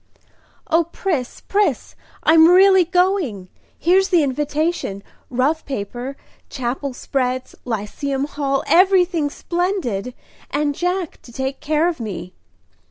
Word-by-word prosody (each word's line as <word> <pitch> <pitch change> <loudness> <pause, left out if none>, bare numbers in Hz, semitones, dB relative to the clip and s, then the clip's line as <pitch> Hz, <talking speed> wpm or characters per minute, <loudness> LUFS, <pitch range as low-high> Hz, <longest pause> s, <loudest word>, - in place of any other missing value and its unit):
"O 330 +1 +4
Pris, 330 -6 -3
Pris, 410 +1 0 0.3
I'm 320 0 +7
really 380 0 +6
going! 355 - 0 0.3
Here's 380 +4 +3
the 350 -5 +4
invitation 295 - -1 0.3
rough 270 +6 0
paper 250 +2 -5 0.3
Chapel 260 +2 -3
spreads 255 -1 -2
Lyceum 255 +5 -3
Hall 275 -2 -1
everything 360 -4 +4
splendid; 305 - -2 0.3
and 295 -1 0
Jack 355 +2 -2
to 240 - -14
take 265 +2 -3
care 310 +2 +1
of 345 -5 -2
me!" 185 -5 -6
295 Hz, 110 wpm, -20 LUFS, 255-350 Hz, 0.3 s, I'm